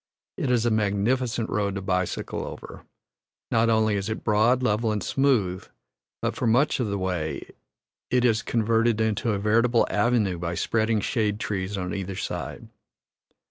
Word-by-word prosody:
It 135 - -2
is 120 -2 +2
a 120 - +2
magnificent 110 +3 0
road 100 -2 0
to 95 - -3
bicycle 90 -1 -2
over; - - -9 0.7
not 115 0 +3
only 110 -1 +3
is 100 +1 -2
it 110 - -4
broad, 115 +4 +3
level, 110 -1 +1
and 105 -3 -2
smooth, 115 -10 +1 0.6
but - - -1
for 125 - -1
much 125 +7 +3
of 120 - 0
the 100 0 -2
way 90 -6 -3 0.6
it 125 0 +2
is 115 -2 +3
converted 115 0 +1
into 110 0 0
a - - 0
veritable 115 +3 +3
avenue 105 -5 +1
by 85 0 -3
spreading 110 +3 +1
shade 105 -3 0
trees 100 -2 -3
on 90 -1 -3
either 95 -1 -4
side. - - -5
110 Hz, 160 wpm, -25 LUFS, 100-115 Hz, 0.7 s, not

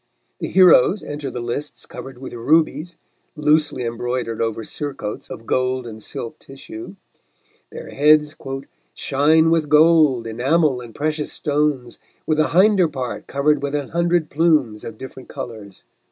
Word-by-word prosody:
The - - -3
heroes 185 +1 +5
enter 145 -1 -5
the 125 - -6
lists 120 +5 -5
covered 135 -1 -10
with 130 - -9
rubies, 155 +6 +1 0.4
loosely 150 -3 +1
embroidered 120 0 -3
over 115 0 -2
surcoats 135 -4 -6
of 115 - -9
gold 130 0 0
and 110 -2 -9
silk 115 - -7
tissue; 330 - -10 0.8
their - - -8
heads 150 +1 +3 0.6
"shine 160 +4 +3
with 160 -3 +1
gold, 150 -5 +5
enamel 130 +4 +1
and 120 -2 -11
precious 155 0 -2
stones, 145 -5 -1 0.3
with 155 -1 0
the 155 - +3
hinder 190 0 +4
part 130 -5 -5
covered 145 +1 +1
with 140 +1 -2
an 145 -2 -3
hundred 170 -1 0
plumes 145 -9 +2
of 110 -1 -8
different 130 0 -10
colours." 110 -7 -8
145 Hz, 140 wpm, -21 LUFS, 125-155 Hz, 0.8 s, heroes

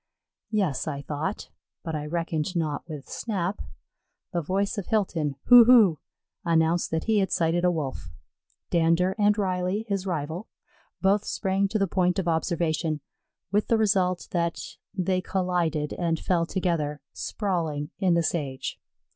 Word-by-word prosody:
'Yes, 195 - 0
I 140 -2 -3
thought; 155 +8 -4 0.3
but 160 - -4
I 150 0 -3
reckoned 165 +1 -2
not 160 -1 -2
with 150 -3 -7
Snap. 200 -3 -3 0.7
The 170 - 0
voice 195 +6 -1
of 195 - -6
Hilton, 170 -10 0
"Hu, 245 -1 +9
hu," 220 -10 +6 0.4
announced 165 0 +2
that 160 0 -1
he 220 -2 +2
had 190 - 0
sighted 170 +1 +1
a 180 - +5
Wolf. 145 - -3 0.6
Dander 170 +2 +3
and 205 0 +4
Riley, 185 +1 -1
his 195 -2 -2
rival, 165 +3 -3 0.6
both 200 +2 +3
sprang 195 -1 0
to 215 - -1
the 195 - +2
point 180 0 +1
of 190 -3 -1
observation, 160 -2 0 0.5
with 210 +1 +1
the 230 - +3
result 190 -4 +1
that 170 -1 0 0.3
they 185 -1 0
collided 175 -5 -1
and 165 -2 -1
fell 170 -2 +1
together, 160 -7 -1
sprawling, 165 -8 -2
in 185 -4 +3
the 170 - +2
sage. 140 -6 -3
175 Hz, 145 wpm, -26 LUFS, 160-195 Hz, 0.7 s, Hu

